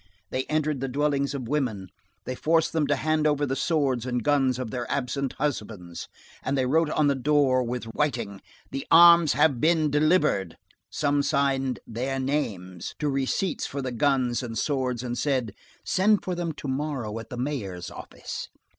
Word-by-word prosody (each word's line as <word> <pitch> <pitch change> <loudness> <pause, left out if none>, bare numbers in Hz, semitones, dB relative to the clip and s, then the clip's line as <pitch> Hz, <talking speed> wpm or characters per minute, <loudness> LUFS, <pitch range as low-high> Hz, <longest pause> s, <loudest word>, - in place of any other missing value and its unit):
They 130 0 -1
entered 155 -2 0
the 135 - -2
dwellings 140 +1 0
of 130 -4 -5
women, 115 -10 -2 0.4
they 130 - -3
forced 160 +5 +1
them 155 -3 +1
to - - +2
hand 155 -1 +1
over 145 -1 +1
the 135 -1 -2
swords 135 -4 +1
and 125 -2 -2
guns 135 -3 +2
of 125 -4 -4
their 120 -2 -4
absent 135 0 -1
husbands, 105 - -4 0.3
and 135 +1 -1
they 130 - +2
wrote 160 +4 +2
on 155 0 +2
the 140 - +4
door, 135 -1 +2
with 125 0 -3
whiting: 115 -5 -2 0.3
"The 135 +2 -5
arms 170 -2 +8
have 140 -7 +3
been 160 -2 +3
delivered"; 150 - +2 0.3
some 145 -1 +1
signed 135 -2 0
"their 130 +4 -3
names" 100 - -3
to 150 -2 -1
receipts 135 +7 -1
for 140 0 -4
the 130 - -3
guns 125 -1 +1
and 115 -3 -5
swords 130 -4 -1
and 120 -1 -3
said: 130 -6 -1 0.3
"Send 205 +2 +3
for 185 - -2
them 175 -1 -2
to 145 - -8
morrow 130 -5 -3
at 115 - -10
the 125 - -6
Mayor's 105 -10 -4
office." - - -7
135 Hz, 175 wpm, -26 LUFS, 125-150 Hz, 0.4 s, arms